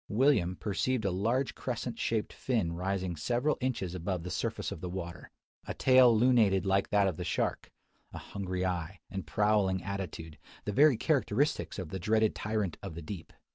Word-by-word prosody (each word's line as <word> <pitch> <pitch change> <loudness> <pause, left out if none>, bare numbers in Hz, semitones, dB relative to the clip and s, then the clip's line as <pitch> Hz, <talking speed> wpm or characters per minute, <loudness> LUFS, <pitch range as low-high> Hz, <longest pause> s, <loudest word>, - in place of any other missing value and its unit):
William 105 -6 +3
perceived 110 +4 -1
a 95 - +2
large 115 +9 0
crescent 120 -1 -4
shaped 110 -2 -1
fin 110 -10 -1
rising 95 0 -2
several 120 - 0
inches 115 -9 -2
above 90 -1 -3
the 90 - -5
surface - - -2
of - - -7
the 90 - -4
water, 85 -1 -6 0.4
a - - -4
tail 130 -2 +6
lunated 110 -5 +4
like 95 0 +2
that 105 -1 +3
of 90 -5 -2
the - - -3
shark, - - -1 0.4
a - - -8
hungry 95 -2 -4
eye, 90 0 -3
and 95 -5 -5
prowling 100 0 +2
attitude: 90 -5 -5 0.3
the 105 - -2
very 145 +2 +6
characteristics 140 -1 0
of 95 -5 -5
the 95 - -4
dreaded 110 +3 +2
tyrant 105 -4 -2
of 100 -5 -7
the 85 - -6
deep. 85 +1 -7
100 Hz, 175 wpm, -31 LUFS, 90-115 Hz, 0.4 s, tail